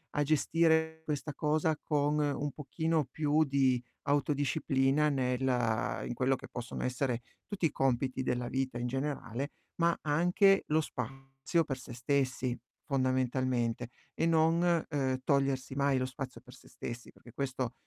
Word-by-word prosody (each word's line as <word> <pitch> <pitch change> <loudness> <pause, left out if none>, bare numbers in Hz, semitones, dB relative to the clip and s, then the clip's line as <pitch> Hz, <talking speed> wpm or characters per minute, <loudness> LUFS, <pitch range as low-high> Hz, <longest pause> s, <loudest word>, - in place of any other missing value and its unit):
a 145 - +3
gestire 160 +1 +2
questa 150 0 -3
cosa 155 0 +1
con 150 0 +1
un 145 0 0
pochino 160 +1 -1
più 150 +3 +2
di 135 -3 +2 0.2
autodisciplina 145 0 +2
nella 125 -4 0
in 120 - -3
quello 130 +2 +2
che - - -10
possono 120 0 -5
essere 125 -1 -1 0.3
tutti 195 -5 -1
i 150 - +2
compiti 130 0 0
della 125 -1 -1
vita 130 -2 -2
in 120 - -1
generale, 135 0 -3 0.2
ma 170 0 +2
anche 180 +6 +4
lo 155 +1 +3
spazio 135 +5 -2
per 135 -2 -3
se 125 -2 -9
stessi 130 -1 0 0.3
fondamentalmente, 130 -3 0 0.3
e 165 - +1
non, 165 +1 +3
uhm, 130 -4 0
togliersi 135 -1 +1
mai 140 -1 +2
lo 130 - 0
spazio 130 -2 -7
per 125 -1 -14
se - - -18
stessi, 120 +1 -7
perché 120 - -16
questo 130 -2 -3
135 Hz, 145 wpm, -32 LUFS, 130-150 Hz, 0.3 s, anche